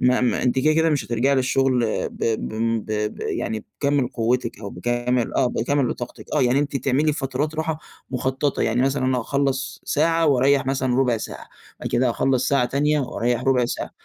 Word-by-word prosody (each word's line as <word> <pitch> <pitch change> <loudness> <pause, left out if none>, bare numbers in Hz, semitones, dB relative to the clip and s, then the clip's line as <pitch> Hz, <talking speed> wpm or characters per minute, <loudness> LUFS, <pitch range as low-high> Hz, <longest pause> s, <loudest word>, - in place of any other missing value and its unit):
ما 125 0 +3
ما 125 - +1
أنتِ 125 +1 +1
كده، 155 +4 +3
كده 160 0 +3
مش 145 -5 0
هترجعي 120 +4 +1
للشغل 130 -1 +2 0.2
ب - - -6 0.2
بم 115 +1 -1
ب - - -14
ب 105 0 -2
يعني 110 -1 -3 0.2
بكامِل 140 -3 +2
قوتِك 120 0 -1
أو 100 - -6
بكامل 120 +4 -1
آه، 130 - +3
بكامل 125 +2 0
طاقتِك، 120 0 -8
آه، - - +3
يعني 125 +2 +3
أنتِ 145 -1 -1
تعملي 140 +3 +1
فترات 145 +2 -2
راحة 160 0 -2 0.3
مُخططة 130 +2 -1
يعني 115 +2 +1
مثلًا، 135 0 +1
أنا 130 -1 +1
هاخلّص 135 +2 -1
ساعة 165 +2 +2
وأريح 140 -1 +3
مثلًا 130 -2 0
ربع 125 -3 +2
ساعة، - - -7 0.3
وبعد - - -4
كده 125 +1 +2
هاخلص 130 +1 +1
ساعة 140 -3 +3
تانية 145 +4 +1
وأريح 120 -2 -1
ربع 130 -2 +3
ساعة. 120 - -4
130 Hz, 190 wpm, -23 LUFS, 120-140 Hz, 0.3 s, ما